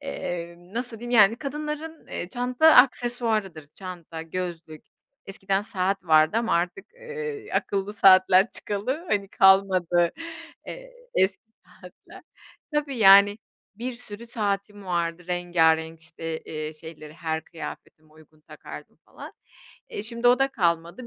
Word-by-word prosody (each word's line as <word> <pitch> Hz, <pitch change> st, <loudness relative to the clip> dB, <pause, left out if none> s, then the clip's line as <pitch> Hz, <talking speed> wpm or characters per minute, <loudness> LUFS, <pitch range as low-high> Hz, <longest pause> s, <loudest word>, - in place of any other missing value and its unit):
emm, 175 Hz, -8 st, -7 dB
nasıl 240 Hz, -2 st, -4 dB
diyeyim, 240 Hz, +1 st, -7 dB
yani, 210 Hz, +3 st, +5 dB
kadınların, 300 Hz, +3 st, -6 dB
eee, 175 Hz, -, -6 dB
çanta 250 Hz, +7 st, +3 dB
aksesuarıdır, 225 Hz, -, +2 dB
çanta, 175 Hz, -4 st, -8 dB
gözlük, 165 Hz, -2 st, -6 dB, 0.4 s
eskiden 195 Hz, 0 st, -2 dB
saat 195 Hz, -1 st, -2 dB
vardı 155 Hz, +3 st, +4 dB
ama 230 Hz, -5 st, 0 dB
artık, 175 Hz, -, -2 dB
eee, 465 Hz, -3 st, -7 dB
akıllı 200 Hz, +1 st, -1 dB
saatler 190 Hz, 0 st, +5 dB
çıkalı, 255 Hz, -, -4 dB
hani, 200 Hz, -4 st, 0 dB
kalmadı, 185 Hz, -3 st, +3 dB, 0.5 s
eee, -, -, -9 dB, 0.2 s
eski 190 Hz, +3 st, +1 dB, 0.2 s
saatler. -, -, -16 dB, 0.5 s
Tabii, 290 Hz, -3 st, -1 dB
yani, 200 Hz, +1 st, +7 dB, 0.4 s
bir 245 Hz, +4 st, -5 dB
sürü 235 Hz, -1 st, -10 dB
saatim 205 Hz, -2 st, -3 dB
vardı 170 Hz, -1 st, -2 dB
rengarenk, 165 Hz, -2 st, +1 dB
işte, 165 Hz, 0 st, -6 dB
eee, 155 Hz, 0 st, -6 dB
şeyleri 155 Hz, -1 st, -12 dB
her 160 Hz, -1 st, -4 dB
kıyafetime 155 Hz, -1 st, -10 dB
uygun 155 Hz, 0 st, -21 dB
takardım -, -, -12 dB
falan, -, -, -11 dB, 0.6 s
eee, 205 Hz, -, -6 dB
şimdi 235 Hz, +2 st, 0 dB
o 245 Hz, +1 st, +5 dB
da 270 Hz, 0 st, +2 dB
kalmadı 170 Hz, 0 st, -1 dB
195 Hz, 125 wpm, -25 LUFS, 170-240 Hz, 0.6 s, yani